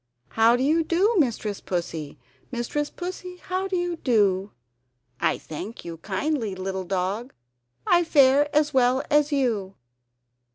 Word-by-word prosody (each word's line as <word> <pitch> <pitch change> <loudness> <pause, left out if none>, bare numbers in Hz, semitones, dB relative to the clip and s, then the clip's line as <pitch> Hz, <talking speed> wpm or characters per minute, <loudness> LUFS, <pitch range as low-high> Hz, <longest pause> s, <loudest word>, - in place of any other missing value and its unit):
How 225 +1 +4
do 250 - 0
you 320 +4 +3
do 365 +8 +2
Mistress 220 -7 -1
Pussy? 165 -4 -4 0.3
Mistress 260 +4 -2
Pussy, 360 0 -7
how 370 +2 -3
do 380 - -2
you 350 -1 -1
do?" 205 -7 +1 0.7
"I - - +1
thank 180 +9 -8
you 165 -1 -6
kindly, 215 - -2
little 190 0 -4
dog, 195 +7 -2 0.5
I 350 0 +4
fare 285 -2 +4
as 300 0 +2
well 260 +1 +3
as 295 0 +3
you!" 225 -9 0
255 Hz, 135 wpm, -25 LUFS, 195-310 Hz, 0.7 s, How